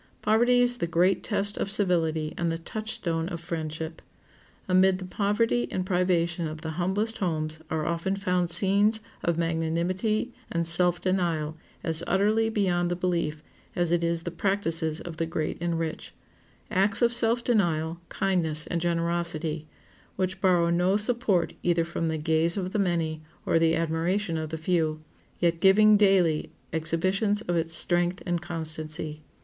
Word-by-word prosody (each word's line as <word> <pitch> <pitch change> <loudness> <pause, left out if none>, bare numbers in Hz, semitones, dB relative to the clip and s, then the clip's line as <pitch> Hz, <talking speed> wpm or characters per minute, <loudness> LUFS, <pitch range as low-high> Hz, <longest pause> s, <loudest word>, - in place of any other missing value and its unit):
Poverty 240 +3 +4
is 245 0 0
the 170 - -2
great 175 +3 +2
test 205 -2 0
of - - -2
civility 165 -6 +2
and 170 -1 -1
the 165 - -2
touchstone 170 -3 -3
of 170 -3 -5
friendship. 160 -1 -5 0.7
Amid 185 0 +4
the 185 - -7
poverty 210 +5 0
and 185 - -2
privation 175 -2 0
of 155 0 -7
the 160 - -4
humblest 190 +7 -1
homes 155 -4 -2
are 155 -1 -2
often 170 +3 -1
found 180 -3 0
scenes 200 +5 +3 0.2
of 170 -1 0
magnanimity 170 +8 -1 0.2
and 170 0 0
self 175 +1 +2
denial 170 -5 -1 0.3
as 165 0 +2
utterly 215 +4 +2
beyond 180 -5 +1
the 175 - -1
belief 170 -4 -2 0.3
as 175 -1 0
it 175 -1 +2
is 170 0 0
the 175 - -4
practices 165 -4 0
of 170 -2 -8
the 165 -1 -1
great 155 -1 -3
and 170 -1 -1
rich—acts 190 +5 -2
of 235 0 +4
self 235 0 +3
denial, 170 -8 0
kindness, 160 -5 +1
and 170 -1 -2
generosity, 170 -2 -2 0.5
which 185 0 -2
borrow 175 -3 +3
no 180 +3 +2
support 215 -5 +1
either 170 -1 +1
from 170 0 -3
the 160 0 -1
gaze 160 +3 +1
of 185 -1 -3
the 215 - 0
many 165 -4 0 0.2
or 165 - +3
the 165 0 +3
admiration 165 +3 -1
of 160 -1 -3
the 160 - -4
few, 160 -2 -1 0.4
yet 170 -1 +1
giving 210 +3 +6
daily 190 -6 +3 0.2
exhibitions 185 +6 +1
of 175 -5 -2
its 165 -1 -1
strength 175 +2 0
and 175 -1 -1
constancy. 155 -2 -5
175 Hz, 155 wpm, -27 LUFS, 165-195 Hz, 0.7 s, giving